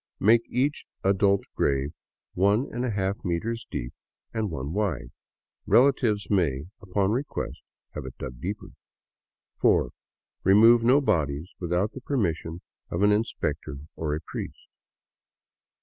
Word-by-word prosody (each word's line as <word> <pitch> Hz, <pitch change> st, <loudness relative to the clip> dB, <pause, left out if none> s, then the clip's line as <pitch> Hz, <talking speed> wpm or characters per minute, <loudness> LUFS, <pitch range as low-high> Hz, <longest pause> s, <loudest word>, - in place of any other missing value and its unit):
Make 115 Hz, +3 st, +4 dB
each 135 Hz, +4 st, 0 dB, 0.2 s
adult 100 Hz, 0 st, +3 dB
grave 70 Hz, +2 st, 0 dB, 0.4 s
13^ 100 Hz, 0 st, +1 dB
meters 110 Hz, +6 st, -2 dB
deep -, -, -4 dB, 0.4 s
and 110 Hz, -2 st, -1 dB
one 70 Hz, -1 st, -4 dB
wide. 85 Hz, -, -1 dB, 0.6 s
Relatives 120 Hz, -6 st, +4 dB
may, 80 Hz, -9 st, +1 dB, 0.2 s
upon 100 Hz, +1 st, 0 dB
request, 130 Hz, +5 st, -3 dB, 0.3 s
have 75 Hz, -3 st, -6 dB
it 65 Hz, -, -10 dB
dug 60 Hz, -1 st, -7 dB
deeper. 100 Hz, +5 st, -4 dB, 0.9 s
4. -, -, +3 dB, 0.5 s
Remove 115 Hz, +5 st, +7 dB
no 130 Hz, +5 st, +5 dB
bodies 80 Hz, -, 0 dB
without 90 Hz, +4 st, 0 dB
the 135 Hz, -, -9 dB
permission 85 Hz, -, -1 dB, 0.3 s
of 85 Hz, +4 st, -1 dB
an 105 Hz, -, +6 dB
inspector 105 Hz, -8 st, -1 dB, 0.2 s
or 75 Hz, -2 st, -1 dB
a 80 Hz, -, -5 dB
priest." -, -, -6 dB
100 Hz, 120 wpm, -27 LUFS, 80-115 Hz, 0.9 s, Remove